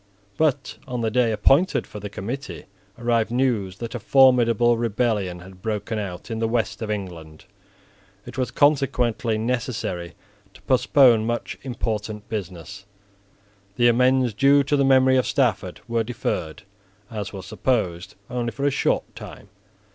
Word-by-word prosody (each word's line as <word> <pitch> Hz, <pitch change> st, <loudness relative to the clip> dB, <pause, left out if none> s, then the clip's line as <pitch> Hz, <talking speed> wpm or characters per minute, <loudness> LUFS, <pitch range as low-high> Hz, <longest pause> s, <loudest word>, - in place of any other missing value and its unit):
But, 145 Hz, -3 st, 0 dB
on 125 Hz, -2 st, -3 dB
the 110 Hz, -1 st, 0 dB
day 120 Hz, -1 st, +2 dB
appointed 135 Hz, -, +3 dB
for 105 Hz, -, -9 dB
the 105 Hz, 0 st, -6 dB
committee, 120 Hz, +8 st, -6 dB, 0.3 s
arrived 115 Hz, -2 st, +1 dB
news 115 Hz, -7 st, 0 dB
that 115 Hz, +1 st, -6 dB
a 120 Hz, -, -4 dB
formidable 120 Hz, -2 st, +4 dB
rebellion 110 Hz, -6 st, -1 dB
had 95 Hz, 0 st, -14 dB
broken 110 Hz, 0 st, -3 dB
out 95 Hz, +1 st, -6 dB
in 110 Hz, -, -3 dB
the 115 Hz, -, 0 dB
West 115 Hz, 0 st, -1 dB
of 110 Hz, -, -4 dB
England. 85 Hz, -7 st, -6 dB, 0.8 s
It -, -, -10 dB
was 130 Hz, -1 st, -1 dB
consequently 130 Hz, -5 st, +1 dB
necessary 110 Hz, -7 st, -3 dB, 0.4 s
to -, -, -16 dB
postpone 125 Hz, -3 st, +4 dB
much 120 Hz, 0 st, -3 dB
important 110 Hz, -4 st, -4 dB
business. 100 Hz, -1 st, -7 dB, 0.9 s
The 120 Hz, +2 st, +4 dB
amends 125 Hz, 0 st, +3 dB
due 140 Hz, +5 st, +4 dB
to 140 Hz, +2 st, 0 dB
the 140 Hz, -, +2 dB
memory 130 Hz, -1 st, +5 dB
of 130 Hz, -, +1 dB
Stafford -, -, 0 dB
were 115 Hz, -1 st, 0 dB
deferred, 100 Hz, -8 st, -4 dB, 0.5 s
as 105 Hz, -3 st, -5 dB
was 95 Hz, -2 st, -8 dB
supposed, 95 Hz, -9 st, -2 dB
only 120 Hz, -1 st, -2 dB
for 140 Hz, -, -4 dB
a 145 Hz, -, +3 dB
short 140 Hz, -, -1 dB
time. -, -, -11 dB
115 Hz, 145 wpm, -23 LUFS, 105-130 Hz, 0.9 s, memory